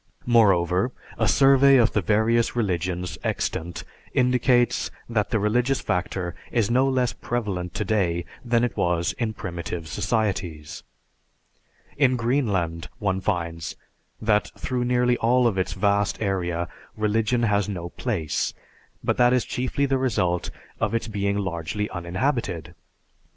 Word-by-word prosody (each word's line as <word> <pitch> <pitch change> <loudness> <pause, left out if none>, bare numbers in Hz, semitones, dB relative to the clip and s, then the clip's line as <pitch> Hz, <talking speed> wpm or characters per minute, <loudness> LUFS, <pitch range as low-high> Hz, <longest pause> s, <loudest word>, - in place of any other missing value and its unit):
Moreover, 95 -3 +3 0.3
a 110 - +2
survey 135 +3 +6
of 120 -2 +4
the 105 - +2
various 110 +6 +2
religions 90 -5 -2
extant 85 +1 -2 0.3
indicates 125 -1 +3 0.2
that 110 -3 0
the 115 - +1
religious 120 +6 +1
factor 90 -1 -2 0.2
is 115 -3 +1
no 130 +3 +3
less 125 -2 +1
prevalent 100 -7 -3
today 95 -5 0 0.2
than 120 -1 +2
it 120 - -1
was 85 -1 +1
in 115 -3 -1
primitive 85 -3 -5
societies. 95 -7 -2 1.2
In 130 -3 +4
Greenland, 105 - 0
one 95 -2 -1
finds, 85 -3 -2 0.4
that 105 -1 +2
through 125 -1 -2
nearly 125 0 +2
all 125 +2 +3
of 105 -5 +2
its 95 - -1
vast 100 +1 +1
area 90 -4 -1 0.3
religion 110 +3 +1
has 105 -2 +2
no 85 -3 -4
place, 90 - -2 0.5
but - - 0
that 120 0 +5
is 125 - +2
chiefly 130 +2 -1
the 135 -1 +1
result 90 -9 0 0.3
of - - 0
its 115 - -1
being 100 -2 -1
largely 95 +1 -2
uninhabited. 90 - -2
105 Hz, 130 wpm, -24 LUFS, 90-120 Hz, 1.2 s, survey